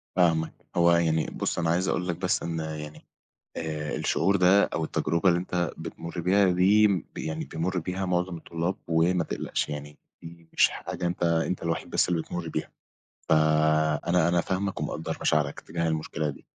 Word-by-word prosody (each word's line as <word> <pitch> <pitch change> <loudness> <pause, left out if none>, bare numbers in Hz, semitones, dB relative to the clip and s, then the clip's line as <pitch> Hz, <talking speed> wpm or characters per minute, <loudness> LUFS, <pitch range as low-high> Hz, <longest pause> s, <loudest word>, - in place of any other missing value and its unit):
فاهمك، 80 -3 +2 0.2
هو 85 0 +5
يعني 80 -2 +2
بُص - - -3
أنا 85 -1 0
عايز 90 +3 +1
أقول 90 - -1
لك 85 - -1
بس 90 +2 -1
إن 85 -1 -3
يعني 75 -1 -6 0.5
آآ 75 -1 -3
الشعور 95 +5 +1
ده 95 +2 +5
أو 80 - -2
التجربة 85 +4 +1
اللي 85 -1 +3
أنت 90 -2 -2
بتمر 85 +1 -6
بيها 95 +2 +3
دي 95 +1 +4
يعني 80 0 -3
بيمر 90 +3 -2
بيها 90 +3 -3
معظم 90 0 0
الطلاب 85 +3 -3
وما 85 +1 +2
تقلقش، - - -3
يعني 75 0 -7 0.2
دي 85 0 -12
مش - - +5
حاجة 90 - -5
أنت 85 0 -3
أنت 85 +2 0
الوحيد 85 -1 -2
بس - - +2
اللي 85 -2 0
بتمر 90 -2 -5
بيها، - - -4 0.6
فأنا 80 +2 +3
أنا 85 -1 +2
فاهمك 95 +2 -2
ومقدر 80 +1 -3
مشاعرك 75 -2 +1
تجاه 85 +1 -3
المشكلة 80 -1 -2
دي. 70 - -9
85 Hz, 170 wpm, -27 LUFS, 80-90 Hz, 0.6 s, هو